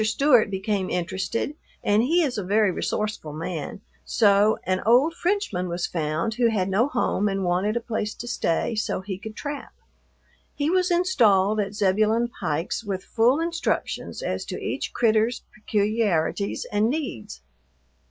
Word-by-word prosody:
Stewart 235 +1 +4
became 195 -1 -1
interested, 190 - -2 0.3
and 205 +1 +3
he 335 +8 +3
is 270 -5 -1
a - - -3
very 205 +1 +2
resourceful 210 -5 -3
man, 165 +2 -5 0.2
so 205 0 +4
an 185 0 0
old 250 +9 +4
Frenchman 340 - -1
was 175 +1 -2
found 160 +5 -2
who 235 0 +2
had 195 -4 0
no 210 +7 +2
home 210 -7 0
and 195 0 -2
wanted 185 +5 +1
a - - -2
place 220 -3 -3
to 240 - -8
stay 170 0 0
so 215 -3 -2
he 190 -1 -6
could 215 +1 -8
trap. 290 +2 -6 0.8
He 290 +2 0
was 365 0 +2
installed 220 - +3
at 200 0 -2
Zebulon 215 +4 +2
Pike's 160 +9 -2
with 195 -3 -4
full 235 +8 +2
instructions 335 0 -2
as - - -2
to - - -5
each - - -3
"critter's" 225 0 +1
peculiarities 205 -3 0
and 210 +2 +2
needs. 120 - -4
215 Hz, 150 wpm, -24 LUFS, 190-240 Hz, 0.8 s, Stewart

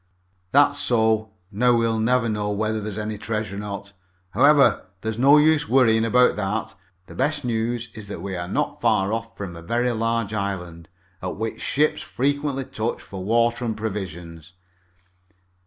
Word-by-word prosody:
"That's 145 +1 +4
so. 110 -4 +2 0.2
Now 120 +4 +3
we'll 115 -1 +1
never 120 +1 +2
know 105 -2 -1
whether 110 +1 -1
there 105 - -4
was 105 - -7
any 105 -1 -4
treasure 105 -3 -3
or - - -4
not. 100 -1 -6 0.4
However, 140 0 +4
there's 110 +1 -3
no 140 +4 +7
use 150 -3 +3
worrying 115 -3 +4
about 125 +2 +4
that. 105 +2 -2 0.3
The - - -12
best 145 -2 -1
news 120 0 -2
is 110 -2 -9
that 95 -4 -7
we 95 -1 -4
are 85 -1 -4
not - - -2
far 95 +2 +2
off 115 0 -5
from 95 -4 -6
a 85 - -9
very 120 +8 0
large 115 -1 -1
island, 90 -5 -4 0.3
at 90 - -4
which 110 +2 -4
ships 150 +2 +1
frequently 140 0 -1
touch 110 0 -3
for 95 -2 -8
water 115 +3 +1
and 115 -2 -2
provisions." 90 -6 -6
110 Hz, 170 wpm, -23 LUFS, 100-120 Hz, 0.4 s, no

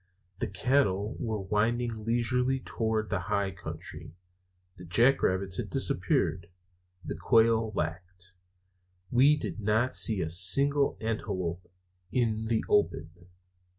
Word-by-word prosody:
The 120 - -2
cattle 105 0 0
were 110 -3 -3
winding 110 +3 -1
leisurely 125 +3 +1
toward 110 -3 -2
the 95 - 0
high 100 -2 0
country; 85 -2 -9 0.6
the 90 - -10
jack 120 +10 +3
rabbits 95 -1 0
had - - -4
disappeared; 85 -2 0 0.6
the - - -4
quail 110 +5 +2
lacked; 90 +1 -5 0.8
we 140 +5 +4
did 145 - -5
not 110 +4 0
see 110 -5 +2
a 80 - -4
single 140 - +4
antelope 90 -6 -4 0.4
in 110 -3 0
the 110 0 -1
open. 85 -4 0
110 Hz, 120 wpm, -28 LUFS, 95-120 Hz, 0.8 s, we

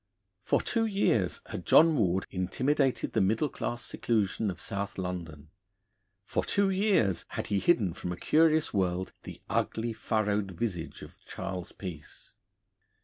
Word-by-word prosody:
For - - +1
two 225 -1 +1
years 115 - +1
had - - -6
John 165 0 +6
Ward 95 -6 +1
intimidated 130 +9 0
the - - +3
middle 110 +9 +2
class 120 -2 -4
seclusion 110 -2 0
of 90 -2 -5
South 100 +2 -4
London; 85 -5 -5 0.7
for - - -1
two 200 -1 +2
years 185 - +2
had - - -4
he 100 - +3
hidden 105 - +2
from 90 - -5
a 90 - -4
curious 155 - +3
world 95 -2 0
the - - -10
ugly, 115 +1 -1
furrowed 105 -3 -1
visage 90 -7 -3
of - - -14
Charles 95 -2 -5
Peace. 85 -6 -9
100 Hz, 145 wpm, -29 LUFS, 90-135 Hz, 0.7 s, John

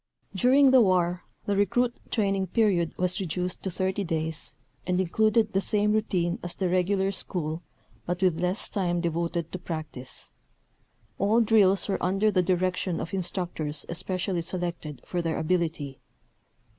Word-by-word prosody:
During 260 +7 +5
the 260 -1 +7
war 180 -3 +2 0.2
the 200 - 0
recruit 235 +5 +2 0.2
training 195 -3 0
period 185 -5 +1
was 180 0 +2
reduced 180 0 -3
to 190 - -3
30 190 +2 -1
days 160 -1 -3 0.3
and 180 0 +1
included 215 +4 +2
the 195 - +2
same 210 0 +2
routine 180 -5 0
as 175 - -5
the 185 -2 -1
regular 190 +2 +1
school 170 -4 -2 0.5
but 175 0 -1
with 175 -3 +2
less 180 +3 -1
time 175 -3 -1
devoted 170 0 -2
to 185 - -5
practice. 155 -7 -7 0.9
All 210 +4 +3
drills 205 -4 +4
were 195 - -1
under 195 +4 +2
the 185 -2 +3
direction 180 -1 0
of 170 - -5
instructors 170 -5 -2
especially 185 +1 -2
selected 170 -5 -4
for 175 - -2
their 165 -1 -1
ability. 160 -4 -1
180 Hz, 145 wpm, -27 LUFS, 170-200 Hz, 0.9 s, the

